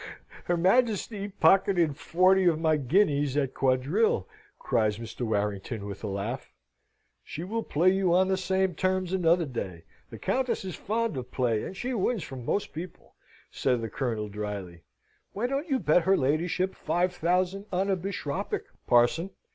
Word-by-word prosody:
"Her 175 Hz, -, +1 dB
Majesty 205 Hz, +1 st, +1 dB
pocketed 180 Hz, -4 st, +3 dB
forty 185 Hz, +6 st, +3 dB
of 165 Hz, -3 st, +3 dB
my 160 Hz, -1 st, +3 dB
guineas 145 Hz, -1 st, +2 dB
at 135 Hz, -3 st, 0 dB
quadrille," 135 Hz, -, +1 dB, 0.3 s
cries 110 Hz, -5 st, 0 dB
Mr. 115 Hz, +1 st, -8 dB
Warrington, 105 Hz, 0 st, -2 dB
with 100 Hz, +1 st, -7 dB
a -, -, -2 dB
laugh. 100 Hz, -, -4 dB, 0.7 s
"She 160 Hz, -, -6 dB
will 225 Hz, +5 st, -2 dB
play 180 Hz, -1 st, +2 dB
you 190 Hz, -2 st, +1 dB
on 185 Hz, +2 st, +4 dB
the 190 Hz, -, +2 dB
same 190 Hz, 0 st, 0 dB
terms 185 Hz, +1 st, -1 dB
another 170 Hz, -2 st, +3 dB
day. 95 Hz, -, -5 dB, 0.3 s
The -, -, -9 dB
Countess 255 Hz, -6 st, -1 dB
is 185 Hz, -, -4 dB
fond 225 Hz, -3 st, -2 dB
of 125 Hz, -1 st, -5 dB
play, 115 Hz, -4 st, 0 dB
and 190 Hz, -, -7 dB
she 255 Hz, +4 st, -3 dB
wins 220 Hz, -2 st, 0 dB
from 130 Hz, -3 st, -8 dB
most 200 Hz, +11 st, -2 dB
people," 170 Hz, +3 st, -9 dB, 0.4 s
said 125 Hz, -2 st, +1 dB
the 115 Hz, -, -4 dB
Colonel, 115 Hz, -6 st, -2 dB
drily. 100 Hz, -4 st, -6 dB, 0.5 s
"Why 210 Hz, +4 st, -2 dB
don't 275 Hz, +6 st, -2 dB
you 270 Hz, -, +2 dB
bet 175 Hz, -6 st, +3 dB
her 190 Hz, 0 st, +4 dB
ladyship 165 Hz, +7 st, 0 dB
five 180 Hz, +1 st, 0 dB
thousand 180 Hz, +3 st, 0 dB
on 190 Hz, +1 st, 0 dB
a -, -, +3 dB
bishopric, 180 Hz, -6 st, -3 dB, 0.2 s
parson? 120 Hz, +10 st, +3 dB
170 Hz, 165 wpm, -28 LUFS, 125-190 Hz, 0.7 s, on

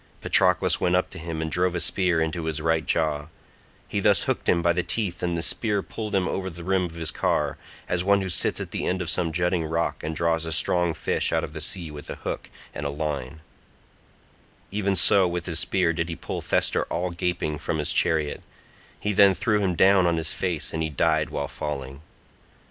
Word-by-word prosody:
Patroclus 90 Hz, -2 st, +3 dB
went 90 Hz, 0 st, +2 dB
up 90 Hz, -, 0 dB
to -, -, -8 dB
him 80 Hz, -1 st, -4 dB
and 80 Hz, -, -4 dB
drove 90 Hz, +1 st, +1 dB
a -, -, 0 dB
spear 90 Hz, -2 st, +1 dB
into 80 Hz, +1 st, -2 dB
his 80 Hz, -2 st, -2 dB
right 80 Hz, 0 st, +1 dB
jaw; 75 Hz, -2 st, 0 dB, 0.6 s
he -, -, -2 dB
thus -, -, +4 dB
hooked -, -, -1 dB
him 85 Hz, -1 st, +3 dB
by 85 Hz, 0 st, +4 dB
the 90 Hz, -, +1 dB
teeth 90 Hz, -2 st, -2 dB
and 85 Hz, -1 st, -1 dB
the 85 Hz, -, -1 dB
spear 105 Hz, -1 st, +1 dB
pulled 105 Hz, -2 st, -4 dB
him 95 Hz, -1 st, +2 dB
over 95 Hz, -1 st, -2 dB
the 85 Hz, -1 st, -9 dB
rim 95 Hz, +1 st, +1 dB
of 85 Hz, -1 st, -8 dB
his 80 Hz, -2 st, -1 dB
car, -, -, 0 dB, 0.3 s
as 90 Hz, 0 st, 0 dB
one 100 Hz, +1 st, +3 dB
who 95 Hz, -, -3 dB
sits 90 Hz, -, 0 dB
at -, -, -6 dB
the -, -, -2 dB
end 95 Hz, -, 0 dB
of 85 Hz, -, -2 dB
some 85 Hz, -3 st, -1 dB
jutting 90 Hz, +1 st, 0 dB
rock 80 Hz, +1 st, -2 dB
and 80 Hz, +1 st, -3 dB
draws 80 Hz, 0 st, +1 dB
a 80 Hz, -, -3 dB
strong 85 Hz, +2 st, +3 dB
fish -, -, 0 dB
out -, -, +1 dB
of -, -, -6 dB
the -, -, -6 dB
sea 85 Hz, -4 st, -3 dB
with 75 Hz, -1 st, -10 dB
a -, -, -4 dB
hook -, -, -5 dB, 0.2 s
and 75 Hz, -1 st, -3 dB
a -, -, -2 dB
line—even 80 Hz, +6 st, -7 dB
so 95 Hz, +2 st, +5 dB
with 85 Hz, 0 st, -3 dB
his 85 Hz, -2 st, 0 dB
spear 90 Hz, -2 st, +2 dB
did 85 Hz, +1 st, -2 dB
he 85 Hz, -, -3 dB
pull -, -, -5 dB
Thestor -, -, +1 dB
all 90 Hz, +1 st, -2 dB
gaping 85 Hz, -3 st, -2 dB
from 80 Hz, 0 st, -2 dB
his 75 Hz, -, 0 dB
chariot; 75 Hz, -2 st, +1 dB, 0.6 s
he 105 Hz, -, -1 dB
then 100 Hz, -1 st, +6 dB
threw 105 Hz, +1 st, +1 dB
him 95 Hz, -3 st, 0 dB
down 95 Hz, +1 st, +5 dB
on 85 Hz, -1 st, +1 dB
his 80 Hz, -1 st, -1 dB
face 85 Hz, -6 st, -2 dB
and 80 Hz, -, -2 dB
he 80 Hz, -, -1 dB
died 80 Hz, +1 st, +1 dB
while -, -, -3 dB
falling. 70 Hz, -2 st, -5 dB
85 Hz, 220 wpm, -25 LUFS, 80-90 Hz, 0.6 s, then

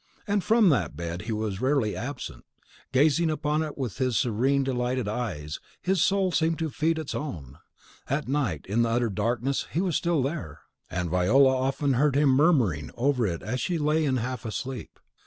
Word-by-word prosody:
And 205 Hz, -2 st, 0 dB
from 220 Hz, -3 st, +5 dB
that 90 Hz, -, 0 dB
bed 85 Hz, +1 st, -4 dB
he -, -, 0 dB
was 105 Hz, -2 st, -2 dB
rarely 130 Hz, -5 st, +1 dB
absent: 130 Hz, +2 st, -6 dB, 0.5 s
gazing 150 Hz, +4 st, +3 dB
upon 150 Hz, 0 st, 0 dB
it 155 Hz, -2 st, -4 dB
with 130 Hz, -4 st, -4 dB
his 130 Hz, -4 st, +1 dB
serene, 130 Hz, +4 st, +2 dB
delighted 125 Hz, -2 st, -1 dB
eyes, 90 Hz, -10 st, -4 dB, 0.2 s
his 190 Hz, -2 st, +1 dB
soul 195 Hz, -1 st, +2 dB
seemed 165 Hz, -1 st, +1 dB
to 160 Hz, -2 st, -2 dB
feed 160 Hz, +3 st, 0 dB
its 155 Hz, -3 st, -4 dB
own. 75 Hz, -, -6 dB, 0.5 s
At 140 Hz, +1 st, -1 dB
night 130 Hz, -, -1 dB
and 105 Hz, +5 st, 0 dB
in 120 Hz, -, +4 dB
utter 115 Hz, -1 st, +1 dB
darkness 120 Hz, +6 st, -1 dB
he 165 Hz, -, -1 dB
was 180 Hz, -4 st, 0 dB
still 170 Hz, -5 st, +1 dB
there; 130 Hz, -, -4 dB, 0.3 s
and 90 Hz, -1 st, -3 dB
Viola 130 Hz, +10 st, +4 dB
often 135 Hz, +2 st, 0 dB
heard 135 Hz, +2 st, +2 dB
him 145 Hz, 0 st, +4 dB
murmuring 130 Hz, -, +3 dB
over 125 Hz, -2 st, +2 dB
it 85 Hz, -3 st, -4 dB
as 125 Hz, +6 st, -2 dB
she 175 Hz, -2 st, -1 dB
lay 155 Hz, +1 st, +1 dB
in 135 Hz, -3 st, +1 dB
a -, -, -1 dB
half 120 Hz, -2 st, -4 dB
sleep. 125 Hz, +4 st, -6 dB
130 Hz, 190 wpm, -27 LUFS, 110-150 Hz, 0.5 s, from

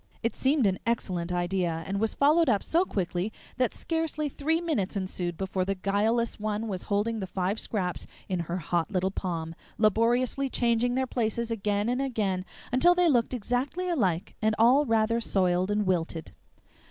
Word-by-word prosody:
It 230 Hz, -, 0 dB
seemed 270 Hz, -1 st, +2 dB
an 190 Hz, -2 st, +1 dB
excellent 185 Hz, -7 st, -1 dB
idea, 175 Hz, -2 st, -1 dB
and 195 Hz, +2 st, -2 dB
was 220 Hz, +1 st, 0 dB
followed 305 Hz, +2 st, +4 dB
up 205 Hz, -4 st, +2 dB
so 345 Hz, +3 st, +2 dB
quickly 185 Hz, -, -2 dB, 0.3 s
that 250 Hz, -2 st, +2 dB
scarcely 320 Hz, -2 st, -2 dB
three 315 Hz, +4 st, 0 dB
minutes 270 Hz, -, -1 dB
ensued 180 Hz, -3 st, -3 dB
before 190 Hz, -1 st, -1 dB
the 195 Hz, +1 st, -1 dB
guileless 215 Hz, +5 st, 0 dB
one 215 Hz, +1 st, -2 dB
was 190 Hz, -4 st, -3 dB
holding 215 Hz, +2 st, 0 dB
the 190 Hz, -, -4 dB
five 190 Hz, +3 st, -1 dB
scraps 185 Hz, -5 st, -3 dB, 0.2 s
in 185 Hz, -2 st, -1 dB
her 170 Hz, +1 st, -3 dB
hot 170 Hz, 0 st, -1 dB
little 190 Hz, -1 st, 0 dB
palm, 165 Hz, -4 st, -3 dB, 0.2 s
laboriously 240 Hz, +5 st, +2 dB
changing 240 Hz, 0 st, +1 dB
their 260 Hz, 0 st, +1 dB
places 235 Hz, -1 st, -1 dB
again 205 Hz, -1 st, 0 dB
and 250 Hz, +2 st, 0 dB
again 205 Hz, -8 st, -1 dB, 0.3 s
until 340 Hz, +9 st, +5 dB
they 355 Hz, -1 st, +4 dB
looked 240 Hz, 0 st, +2 dB
exactly 250 Hz, -, -2 dB
alike 190 Hz, -, 0 dB
and 215 Hz, 0 st, +2 dB
all 260 Hz, +6 st, +5 dB
rather 225 Hz, +1 st, +2 dB
soiled 185 Hz, -3 st, +1 dB
and 210 Hz, 0 st, +1 dB
wilted. 165 Hz, -3 st, -1 dB
215 Hz, 170 wpm, -28 LUFS, 185-245 Hz, 0.3 s, until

